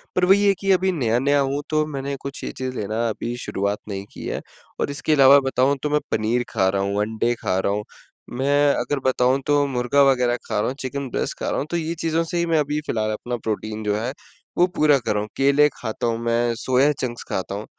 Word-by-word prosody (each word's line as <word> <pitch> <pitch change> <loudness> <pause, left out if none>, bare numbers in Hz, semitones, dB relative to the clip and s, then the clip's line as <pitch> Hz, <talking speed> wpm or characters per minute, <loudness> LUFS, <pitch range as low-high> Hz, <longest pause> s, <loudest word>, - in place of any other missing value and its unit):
पर 180 - +3
वही 200 +2 +5
है 200 - +5
कि 195 0 +1
अभी 190 0 +3
नया-नया 135 -1 +1
हूँ 140 +1 0
तो 155 0 +1
मैंने 140 -2 -4
कुछ 140 0 -7
ये - - -3
चीज़ 130 0 -4
लेना 110 +3 -1
अभी 115 +2 -4
शुरुआत 100 +1 -1
नहीं 100 0 -5
की - - -8
है - - -3 0.4
और - - -1
इसके 145 +2 0
अलावा 140 -1 +7
बताऊँ 135 +2 +2
तो 150 - 0
मैं 150 0 +2
पनीर 115 +3 +1
खा 95 -4 +1
रहा 95 0 0
हूँ, 100 +1 0
अंडे 110 +3 0
खा 95 - 0
रहा 100 - 0
हूँ, 105 +1 -2 0.5
मैं 140 +3 +2
अगर 145 -1 -1
बताऊँ 130 +1 +2
तो 145 -1 +3
मुर्गा 125 +2 +1
वग़ैरह 125 -2 +1
खा - - -1
रहा - - 0
हूँ, 130 - -3
चिकन 135 +1 -4
ब्रेस्ट - - -3
खा - - -2
रहा - - -1
हूँ, 140 - -2
तो 170 - 0
ये 165 +1 -3
चीज़ों 165 0 +1
से 170 +1 -3
ही 170 - +1
मैं 165 -2 +2
अभी 150 +1 -1
फ़िलहाल 110 -1 -1
अपना 120 +3 -4
प्रोटीन 110 -1 -4
जो 105 -1 0
है 115 +4 -2 0.5
वो 175 - +6
पूरा 150 -2 +4
कर 115 - -1
रहा 105 - 0
हूँ, 105 - -6
केले 140 +2 +5
खाता 110 +2 -3
हूँ, 115 -1 0
मैं 120 0 +1
सोया 130 +4 +2
चंक्स 120 -2 -4
खाता 95 +1 -3
हूँ। 105 - -5
130 Hz, 240 wpm, -22 LUFS, 110-145 Hz, 0.5 s, अलावा